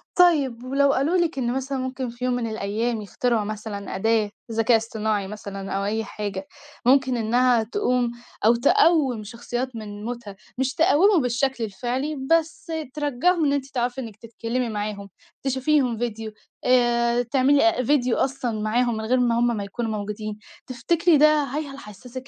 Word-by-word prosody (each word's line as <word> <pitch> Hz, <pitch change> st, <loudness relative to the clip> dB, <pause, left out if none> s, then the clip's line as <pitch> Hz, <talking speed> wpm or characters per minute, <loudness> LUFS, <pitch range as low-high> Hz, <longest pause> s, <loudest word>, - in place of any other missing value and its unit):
طَيب. 285 Hz, -10 st, +3 dB
ولو 275 Hz, +2 st, +2 dB
قالوا 305 Hz, +7 st, +1 dB
لِك 340 Hz, -4 st, 0 dB
إن 240 Hz, -2 st, 0 dB
مثلًا 265 Hz, +1 st, -2 dB
ممكن 260 Hz, -1 st, -3 dB
في 240 Hz, +2 st, -5 dB
يوم 250 Hz, -, +1 dB
من 245 Hz, -2 st, -1 dB
الأيام، 220 Hz, +2 st, -2 dB
يخترعوا 225 Hz, +2 st, 0 dB
مثلًا 210 Hz, -1 st, -5 dB
أداة 220 Hz, +1 st, +1 dB, 0.2 s
ذكاء 225 Hz, +1 st, +3 dB
اصطناعي 220 Hz, -2 st, -2 dB
مثلًا، 195 Hz, -1 st, -7 dB
أو 195 Hz, 0 st, -1 dB
أي 220 Hz, +2 st, -1 dB
حاجة 200 Hz, -2 st, -5 dB, 0.4 s
مُمكن 260 Hz, 0 st, +4 dB
إنها 240 Hz, +1 st, +3 dB
تقوم 245 Hz, -, 0 dB, 0.3 s
أو 230 Hz, +2 st, +6 dB
تقّوم 285 Hz, -, +3 dB
شخصيات 240 Hz, +3 st, -5 dB
من 210 Hz, -1 st, -7 dB
موتها، 235 Hz, -4 st, -6 dB, 0.2 s
مش 265 Hz, +1 st, 0 dB
تقوّمه 355 Hz, +2 st, +4 dB
بالشكل 250 Hz, 0 st, 0 dB
الفعلي 250 Hz, +8 st, -3 dB, 0.2 s
بس 330 Hz, 0 st, +1 dB, 0.2 s
ترجّعهُم، 300 Hz, +4 st, +1 dB
إن 285 Hz, -, +2 dB
أنتِ 280 Hz, -2 st, -1 dB
تعرفي 250 Hz, -1 st, -2 dB
إنِك 225 Hz, -4 st, -8 dB
تتكلِمي 230 Hz, +2 st, -3 dB
معاهُم 205 Hz, -2 st, -4 dB, 0.3 s
تشوفيهم 265 Hz, -2 st, +1 dB
ڤيديو 225 Hz, -2 st, -3 dB, 0.3 s
آآ 240 Hz, -1 st, +3 dB
تعملي 270 Hz, +3 st, +3 dB
أ 230 Hz, -, -1 dB
ڤيديو 255 Hz, -2 st, +2 dB
أصلًا 245 Hz, -5 st, -1 dB
معاهُم، 235 Hz, +2 st, +1 dB
من 220 Hz, -, -4 dB
غير 255 Hz, +3 st, +2 dB
ما 235 Hz, -1 st, +2 dB
هُم 240 Hz, -, +3 dB
ما 205 Hz, -, -3 dB
يكونوا 225 Hz, +3 st, -4 dB
موجودين. 210 Hz, 0 st, -5 dB, 0.3 s
تفتكري 330 Hz, +6 st, +2 dB
ده 300 Hz, +2 st, +7 dB, 0.2 s
هاي 290 Hz, +3 st, -3 dB
هل 275 Hz, 0 st, -9 dB
حَسسِك 250 Hz, +4 st, -10 dB
240 Hz, 160 wpm, -24 LUFS, 220-270 Hz, 0.4 s, ده